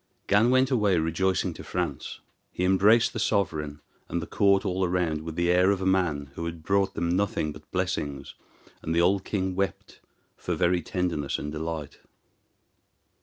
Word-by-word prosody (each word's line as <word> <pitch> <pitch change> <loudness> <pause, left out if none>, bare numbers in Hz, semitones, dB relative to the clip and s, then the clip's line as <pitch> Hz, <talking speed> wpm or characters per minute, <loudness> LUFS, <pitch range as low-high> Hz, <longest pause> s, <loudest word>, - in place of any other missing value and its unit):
Gan 105 +4 +4
went 130 +1 +3
away 105 -7 +3
rejoicing 85 +4 0
to - - -10
France. - - -4 0.3
He 90 - -3
embraced 100 +5 +4
the 115 - -3
sovereign 75 -8 -1 0.3
and 85 - -1
the 85 - -5
court 100 +2 +2
all 95 0 0
round 85 -3 0
with 80 0 -7
the 85 +1 +2
air 90 +2 +4
of 100 -2 +1
a 95 - -3
man 85 -7 0
who 85 - -5
had 85 -1 -6
brought 100 +2 +1
them 85 +1 0
nothing 95 -6 0
but - - -13
blessings, 70 -2 -3 0.5
and 80 - -2
the 85 - +4
old 95 +2 +2
king 95 -2 -2
wept 95 +1 -4 0.4
for - - -3
very 90 0 +2
tenderness 85 -5 -2
and 75 - -5
delight. 80 -1 -5
90 Hz, 170 wpm, -27 LUFS, 80-95 Hz, 0.5 s, Gan